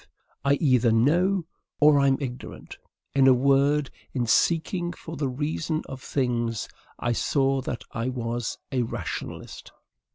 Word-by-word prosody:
I 140 +1 +4
either 130 -6 +3
KNOW, 170 - +3 0.3
or 150 -1 +6
am 135 -1 +3
IGNORANT. 125 -3 -7 0.3
In 135 -1 +5
a 130 - +7
word, 140 +2 +2 0.2
in 125 -3 0
seeking 175 - +1
for 165 -1 -9
the 140 -2 -1
reason 155 +4 -2
of 135 -1 -8
things, 120 -5 -1 0.3
I 120 - -1
saw 135 +2 +1
that 120 -2 -5
I 115 +3 -2
was 120 -2 -3
a 130 -2 +1
RATIONALIST. 115 - -6
135 Hz, 135 wpm, -26 LUFS, 125-150 Hz, 0.3 s, a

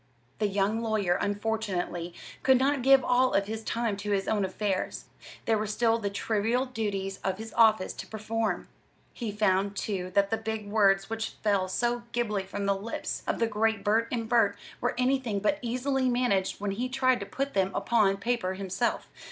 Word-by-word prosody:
The 210 - +2
young 205 +3 0
lawyer, 215 -6 +1
unfortunately, 200 -5 -2 0.3
could 265 -1 +5
not 275 +1 +2
give 270 +1 +6
all 250 +1 +3
of 200 - +3
his 220 +2 -5
time 230 -2 -1
to 205 +1 -5
his 195 -1 0
own 210 -2 +1
affairs; 190 0 -2 0.4
there 220 -2 +2
were 215 - -2
still 225 +2 +2
the 205 -2 -2
trivial 225 +5 0
duties 200 -6 -3
of 190 -1 -1
his 220 +1 -8
office 220 -4 +4
to - - -8
perform. 220 -3 -2 0.5
He 230 -4 -4
found, 200 -1 +1
too, 185 -4 -2
that 200 +1 +3
the 225 - +2
big 220 -1 -4
words 200 -2 +3
which 225 0 -4
fell 200 -3 +2
so 240 +5 0
glibly 210 -5 -1
from 200 +1 -4
the 200 - +3
lips 205 +4 -4
of - - 0
the 230 - +2
great 220 -1 0
Burt 225 +2 +2
& - - -3
Burt 225 -4 +3 0.2
were 245 - 0
anything 250 -4 +1
but 250 +9 +1
easily 255 +2 0
managed 240 -6 +1
when 205 0 -2
he 245 +6 -2
tried 255 -1 +2
to 200 - -6
put 275 +1 -3
them 190 -1 +2
upon 210 -4 +2
paper 200 -3 -1
himself. 195 +5 -2
220 Hz, 185 wpm, -28 LUFS, 200-235 Hz, 0.5 s, give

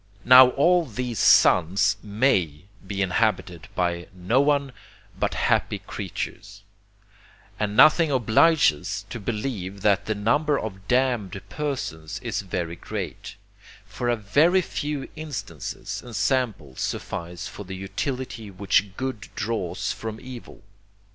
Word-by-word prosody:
Now 125 +1 +9
all 175 +4 +4
these 125 - -4
suns 90 +3 +5
MAY 100 - +1 0.2
be 100 0 -1
inhabited 90 -3 -1
by 85 -1 -1
none 135 +8 +1 0.4
but - - -1
happy - - +1
creatures; - - -7 1.0
and 105 0 -2
nothing 155 +1 +6
obliges 130 - +4
us - - -5
to 115 - -5
believe 105 -3 -4
that 100 -1 +3
the 110 - 0
number 145 +8 +1
of 95 -2 -7
damned 120 -7 +1
persons 110 - -4
is 115 -4 -2
very 85 -3 -4
great; - - -6 0.5
for 120 - -3
a 120 - +3
VERY 150 - +3
FEW 145 -4 -4
INSTANCES 110 - -6
AND 120 -2 -10
SAMPLES 110 - -1
SUFFICE 85 +1 -4
FOR 105 - -8
THE 95 0 -7
UTILITY 110 +4 -4
WHICH 100 +1 0
GOOD 130 -5 -4
DRAWS 105 -6 -2
FROM 110 -1 -6
EVIL. 125 -2 -11
110 Hz, 120 wpm, -24 LUFS, 95-130 Hz, 1.0 s, Now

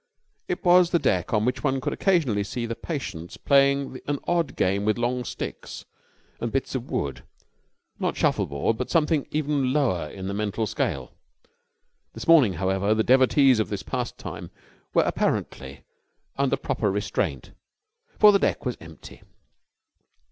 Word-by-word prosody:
It 365 - -4
was 180 0 +6
the 175 - +3
deck 95 - 0
on 110 -1 +1
which 125 - -1
one 135 -2 +1
could - - -2
occasionally 145 - +1
see 115 +4 -4
the 115 - -3
patients 95 - -6
playing 140 -1 +2
an 145 0 0
odd 170 -3 0
game 95 +2 +1
with 110 +2 +1
long 125 +1 -1
sticks - - -7 0.5
and 120 - -3
bits 135 - -2
of 130 -1 -4
wood 70 -3 -3 0.8
not - - -1
shuffleboard 70 +11 0
but 125 - -3
something 155 -3 +1
even 145 -3 0
lower 120 - 0
in 95 -1 -7
the 100 - -3
mental 105 +2 -2
scale. - - -3 1.0
This - - -8
morning, 150 - +6
however, 95 +4 0
the 110 - +2
devotees 130 0 +4
of 110 - 0
this 100 -2 -4
pastime - - -5 0.4
were - - +3
apparently - - -2 0.5
under 135 0 +1
proper 110 -5 -1
restraint, 100 +1 -2 0.7
for 210 -1 +8
the 200 - +3
deck - - -1
was 125 - -2
empty. 80 -1 -13
125 Hz, 150 wpm, -25 LUFS, 100-145 Hz, 1.0 s, for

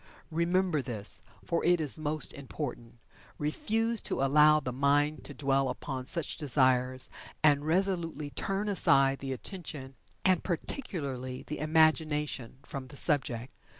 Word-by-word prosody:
Remember 170 -1 +1
this, 105 -6 +2 0.2
for 170 - -1
it 175 0 +4
is 155 0 0
most 155 -1 -3
important. 130 -4 -7 0.4
Refuse 225 +9 0
to - - -2
allow 150 +2 +5
the 130 -4 -5
mind 145 +3 +1
to - - -7
dwell 135 -2 +1
upon 130 -2 -5
such 165 -1 -2
desires, 130 -3 +3 0.4
and 145 -1 +4
resolutely 165 -4 -1
turn 195 +5 -2
aside 135 -9 +4
the 135 -1 -5
attention, 140 -2 -6 0.3
and, 185 -2 +3
particularly, 140 - -4
the 150 - -5
imagination, 155 -5 +1
from 135 -1 -7
the 140 +2 -11
subject. 135 -5 +2
150 Hz, 130 wpm, -30 LUFS, 130-165 Hz, 0.4 s, allow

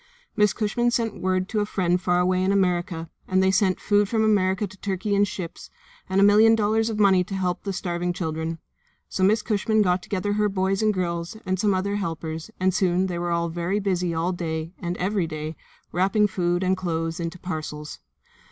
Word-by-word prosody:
Miss 210 -2 +4
Cushman 235 +4 0
sent 230 -3 -1
word 185 0 0
to 215 -2 0
friends 180 -3 0
far 180 -1 +2
away 185 0 +2
in 190 - +2
America, 180 -3 0 0.2
and 185 0 +2
they 190 - +4
sent 190 -1 +2
food 205 -1 +2
from 220 -2 +1
America 200 -2 +2
to 190 -1 -11
Turkey 195 +1 -2
in 200 0 +4
ships, 185 -4 -7 0.4
and 190 +1 +2
a - - +6
million 215 +2 +6
dollars 220 +1 +1
of 220 - -3
money 190 -3 +5
to 195 +2 -6
help 180 -2 -1
the 200 - -3
starving 175 -1 -2
children. 160 -1 -3 0.5
So 190 - -1
Miss 210 +4 +3
Cushman 215 0 +2
got 180 -1 +1
together 205 +2 -2
her 210 0 +2
boys 195 0 0
and 215 -1 +3
girls 170 0 -3
and 185 -1 -1
some 205 -2 +2
other 200 +2 -1
helpers, 165 -3 -4
and 185 0 +2
soon 185 0 +2
they 175 -2 -3
were 170 -1 0
very 175 +4 -1
busy 180 -3 0
all 165 +2 0
day 165 -2 -4
and 175 -1 -3
every 190 -1 0
day 155 0 -5 0.4
wrapping 195 +4 +2
food 175 -2 0
and 185 +1 +2
clothes 165 -2 -3
into 170 +1 -4
parcels. 155 -4 -6
185 Hz, 200 wpm, -24 LUFS, 175-205 Hz, 0.5 s, a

